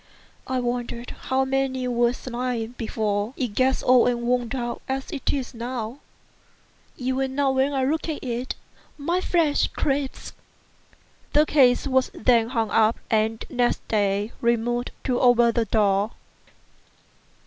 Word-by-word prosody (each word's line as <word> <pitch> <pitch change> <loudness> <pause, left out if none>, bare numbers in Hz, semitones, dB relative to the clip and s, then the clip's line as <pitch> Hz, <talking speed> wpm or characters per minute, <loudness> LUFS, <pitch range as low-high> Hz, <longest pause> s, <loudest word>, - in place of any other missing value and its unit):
I 260 0 0
wonder 240 -1 -3 0.2
how 265 0 +1
many 265 -1 -1
were 240 -1 +2
slain 245 -2 -4
before 215 0 -2
it 250 -3 -1
got 260 +5 +1
old 250 -1 +5
and 240 -1 -2
worn 245 -1 +1
out 240 -2 -3
as 265 0 -3
it 275 - -1
is 270 -2 -3
now. 240 +1 -5 1.0
Even 260 +1 -1
now 280 -1 +2
when 265 +2 +2
I 270 -2 0
look 315 +4 -1
at 305 - -4
it 250 +1 -3 0.4
my 340 +5 0
flesh 330 -6 +2
creeps." 275 -1 -2 1.0
The 300 +1 +5
case 265 -5 +4
was 260 -1 +2
then 230 -1 +3
hung 225 -4 -1
up, 220 0 +3
and 220 0 +1
next 245 -1 0
day 205 0 +1
removed 235 +1 +1
to 250 -2 0
over 240 -1 +5
the 230 0 0
door. 205 -2 +2
245 Hz, 140 wpm, -24 LUFS, 230-265 Hz, 1.0 s, old